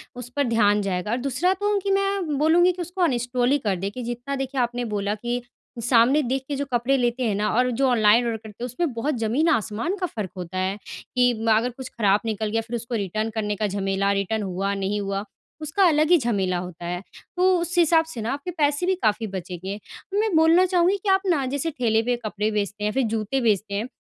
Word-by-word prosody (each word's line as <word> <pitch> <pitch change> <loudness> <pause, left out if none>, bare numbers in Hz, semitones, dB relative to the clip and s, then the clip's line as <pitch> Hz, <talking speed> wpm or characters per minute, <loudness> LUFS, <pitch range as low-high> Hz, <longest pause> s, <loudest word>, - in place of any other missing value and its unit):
उस 245 -1 -7
पर 285 - +2
ध्यान 210 -3 +3
जाएगा। 195 +1 -2
और 240 - +1
दूसरा 275 +8 +1
तो 410 +2 0
कि 395 +1 -2
मैं 390 -6 0
बोलूँगी 335 +4 +4
कि 360 0 -6
उसको 355 +2 -5
अनइंस्टॉल 245 -4 +1
ही 285 - +4
कर 195 - +2
दें 190 +2 -3
कि 250 +4 -6
जितना 240 +4 -4
देखिए 270 -1 -2
आपने 245 0 -1
बोला 200 +1 -1
कि 240 +3 -3 0.4
सामने 245 +5 +4
देख 265 +2 -1
के 290 - -2
जो 285 +1 -2
कपड़े 240 +3 +2
लेते 245 0 0
हैं 215 -4 +1
ना, 210 +1 0
और 250 +3 +3
जो 265 +3 +1
ऑनलाइन 230 0 +4
ऑर्डर 230 -1 -1
करते 220 +1 -11
हैं - - 0
उसमें 260 +4 -2
बहुत 255 +6 -1
जमीन-आसमान 240 - +1
का - - +2
फ़र्क 210 - -5
होता 180 +1 -6
है, 190 +2 -1 0.4
कि 245 0 +4 0.2
अगर 230 +3 +1
कुछ 250 +1 -9
खराब 205 -3 +2
निकल 220 -1 -2
गया 225 +1 0
फिर 225 +2 -6
उसको 235 +1 -4
रिटर्न 215 +1 -2
करने 210 -2 -1
का 210 +1 -1
झमेला 195 0 0
रिटर्न 200 +2 -1
हुआ 195 +1 -2
नहीं 200 +1 -1
हुआ, 195 0 -2 0.4
उसका 310 +6 +1
अलग 310 -1 +3
ही 350 - +8
झमेला 200 - 0
होता 175 -1 -7
है। 175 +1 -3 0.4
तो 370 +1 +4
उस 345 +1 -3
हिसाब 330 -1 +5
से 320 -8 -7
ना 225 +3 -2
आपके 285 +6 -5
पैसे 295 0 +1
भी 375 +1 +2
काफ़ी 215 +1 +1
बचेंगे, 185 0 -5
और 395 - -6
मैं 430 -4 +1
बोलना 325 +3 +5
चाहूँगी 365 +1 +2
कि 410 - 0
आप 385 0 +4
ना 310 -7 +2
जैसे 325 +4 -1
ठेले 230 -6 +1
पे 245 +1 +1
कपड़े 215 0 -1
बेचते 210 0 -2
हैं 210 - +2
या - - -2
फिर 265 - +1
जूते 225 +5 -1
बेचते 210 -3 +1
हैं, 215 +5 -2
240 Hz, 230 wpm, -24 LUFS, 210-295 Hz, 0.4 s, ही